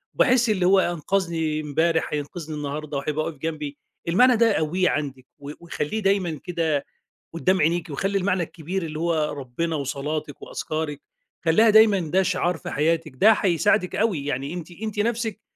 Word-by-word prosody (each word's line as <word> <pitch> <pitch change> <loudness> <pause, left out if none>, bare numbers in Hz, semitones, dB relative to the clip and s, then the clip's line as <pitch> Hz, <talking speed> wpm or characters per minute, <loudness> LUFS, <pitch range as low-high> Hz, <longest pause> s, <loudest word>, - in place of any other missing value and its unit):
وباحس 250 -3 +4
اللي 190 -4 +1
هو 190 +1 +5
أنقذني 170 -3 -1
امبارح 160 +3 +1
هينقذني 155 +2 -5
النهارده 145 0 -4
وهيبقى 150 +2 -2
واقف 155 - -5
جنبي. 150 -2 -4 0.3
المعنى 245 +9 +5
ده 230 -2 +4
قوّيه 180 +2 +1
عندِك 135 -4 -3
و 145 0 -7
وخلّيه 170 +4 -3
دايمًا 195 -6 0
كده 160 -5 -1 0.5
قدام 185 +2 +1
عينيكِ، 170 +2 +1
وخلّي 195 +8 -1
المعنى 185 -2 +1
الكبير 170 +3 -5
اللي 155 -1 -5
هو 160 -3 0
ربنا 145 +5 -3
وصلاتك 145 +1 -4
وأذكارك، 155 -2 -4 0.4
خلّيها 215 +8 +5
دايمًا 215 -2 +6
ده 180 +3 +1
شعار 180 -2 0
في - - -7
حياتِك، 160 0 0
ده 210 +12 +6
هيساعدِك 180 -3 +2
أوي 195 -10 0
يعني 140 +2 -3
أنتِ 175 -1 -7
أنتِ 210 +3 -5
نفسِك 225 -1 -1
165 Hz, 160 wpm, -24 LUFS, 150-190 Hz, 0.5 s, دايمًا